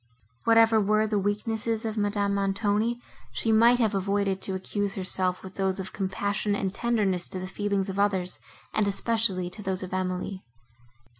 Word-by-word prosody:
Whatever 225 -1 +5
were 215 +2 +3
the 210 -1 0
weaknesses 220 +2 -1
of 220 -1 -2
Madame 205 -1 0
Montoni, 205 +4 0 0.3
she 225 - 0
might 230 +3 +6
have 220 -3 +2
avoided 195 0 0
to 190 - -3
accuse 200 +1 -2
herself 185 -1 0
with 190 0 -9
those 190 0 0
of 190 - -5
compassion 200 +1 -1
and 195 -2 -2
tenderness 200 -6 0
to - - -5
the 185 - -4
feelings 200 0 -1
of 195 0 -4
others, 190 -3 0 0.3
and 210 -2 +2
especially 200 -3 0
to 210 - -5
those 190 -2 -1
of 185 - -7
Emily. 185 +1 -2
200 Hz, 165 wpm, -27 LUFS, 190-215 Hz, 0.3 s, might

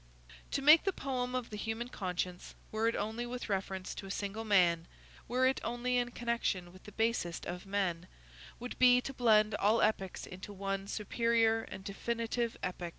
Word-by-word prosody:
To 275 - -1
make 305 +3 +8
the 390 - +1
poem 255 -4 -2
of 250 -3 -3
the 210 - -5
human 225 +3 -3
conscience, 180 -4 -4 0.2
were 220 +1 +1
it 230 - +1
only 220 +4 -2
with 245 -1 -5
reference 190 -1 -2
to 195 - -7
a - - -9
single 200 +2 -3
man, 175 -6 +3 0.4
were 255 +2 +2
it 260 +1 +2
only 240 +2 0
in 245 0 +1
connection 235 -7 -2
with 185 - -16
the 210 - -9
basest 220 -6 -1
of 180 +2 -6
men, 185 -3 -1 0.5
would 245 +1 -7
be 250 -1 +7
to 270 +2 -5
blend 215 -4 +4
all 210 +2 +3
epics 195 -4 0
into 190 +3 -9
one 195 0 -3
superior 225 +1 +2
and 190 - -9
definitive 230 +3 -2
epic. 180 -1 -3
220 Hz, 180 wpm, -33 LUFS, 195-240 Hz, 0.5 s, make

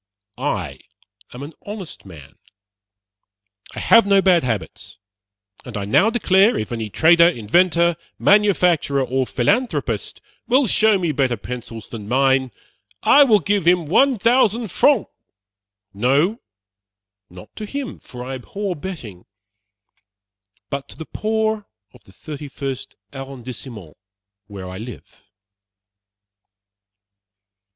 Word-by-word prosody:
I 90 - -3 0.5
am 125 +3 -9
an 150 +3 -9
honest 205 - -8
man. 75 -6 -14 1.4
I - - -5
have 230 -3 +5
no 200 -1 +5
bad 185 -3 +3
habits; 110 -6 -5 0.7
and 120 -4 -7
I 100 - -3
now 190 - +3
declare, 210 -2 +3
if 110 - -4
any 115 -2 -4
trader, 170 - +5
inventor, 170 - +2 0.2
manufacturer, 180 -9 +3
or 130 0 -1
philanthropist 225 - -1 0.3
will 260 +3 +3
show 220 -1 +3
me 175 -4 -1
better 130 -4 0
pencils 115 0 -8
than 105 -3 -8
mine, 130 +1 +2 0.5
I 290 - +7
will 230 -6 +5
give 200 0 -1
him 175 -1 +4
1,000f. 235 - +3 0.9
no, 140 - +1 0.9
not 90 0 -14
to 215 - -6
him, 280 +2 -6
for 125 -1 -10
I 135 - -5
abhor 190 +9 -5
betting 145 - -8 1.5
but 140 0 -5
to - - -12
the 160 - -7
poor 220 +1 -2 0.3
of - - -20
the - - -18
Thirty 145 - -9
first 135 -1 -6 0.2
Arrondissement, 125 - -9 0.5
where 95 -2 -8
I 95 +1 -8
live." 115 0 -11
150 Hz, 115 wpm, -20 LUFS, 120-200 Hz, 1.5 s, I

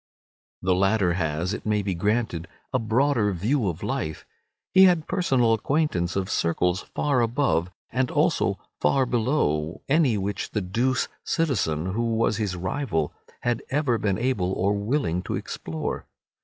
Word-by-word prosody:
The 95 0 +3
latter 95 -1 +2
has, 85 +2 -1
it - - -5
may 105 -1 +1
be 95 -1 -1
granted, 100 -2 -1 0.3
a 130 - +3
broader 115 -1 +2
view 110 - 0
of 85 - -6
life. 80 0 -3 0.5
He 190 0 +8
had 175 -4 +3
personal 135 -11 +2
acquaintance 115 - 0
of 95 -1 0
circles 90 +1 +1
far 140 -4 +2
above, 115 - +1 0.2
and 125 0 +1
also - - +1 0.2
far 135 -1 +3
below, 110 - 0
any 140 -6 +3
which 100 +1 -3
the 105 - 0
douce 120 +8 0 0.2
citizen, 95 - 0
who 115 +1 0
was 110 -2 +1
his 105 -5 -1
rival, 90 - -2 0.3
had 120 -1 0
ever 135 -5 +1
been 100 -2 0
able 110 -6 0
or 100 +2 +1
willing 100 - 0
to - - -3
explore. 80 -1 -4
105 Hz, 150 wpm, -25 LUFS, 90-130 Hz, 0.5 s, He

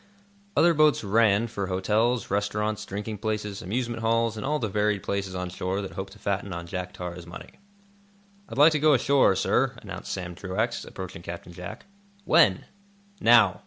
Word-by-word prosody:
Other 170 0 +6
boats 155 -4 +4
"ran" 105 +1 +3
for 100 -4 -4
hotels, 110 +6 0
restaurants, 105 +1 -1
drinking 105 +1 -5
places, 105 -1 -3
amusement 115 +3 -3
halls, 115 0 +1
and 110 - -5
all 150 +3 0
the 115 - -2
varied 105 0 0
places 100 -2 -3
on 90 -1 -4
shore 95 +2 -2
that 95 - -6
hope 95 0 -6
to 100 - -15
fatten 100 -1 -2
on 85 0 -5
Jack 90 +1 -5
Tar's 90 -1 -7
money. 85 - -11 0.9
"I'd - - -7
like 150 +3 +7
to 155 - +1
go 150 -1 +5
ashore, 130 -5 +4
sir," 95 - +1
announced - - -7
Sam 90 -1 -4
Truax, 100 +7 -2
approaching 95 -3 -8
Captain 85 0 -8
Jack. 90 +6 -8 0.4
"When?" 95 -2 +4 0.5
"Now." 115 - +5
105 Hz, 170 wpm, -26 LUFS, 95-115 Hz, 0.9 s, like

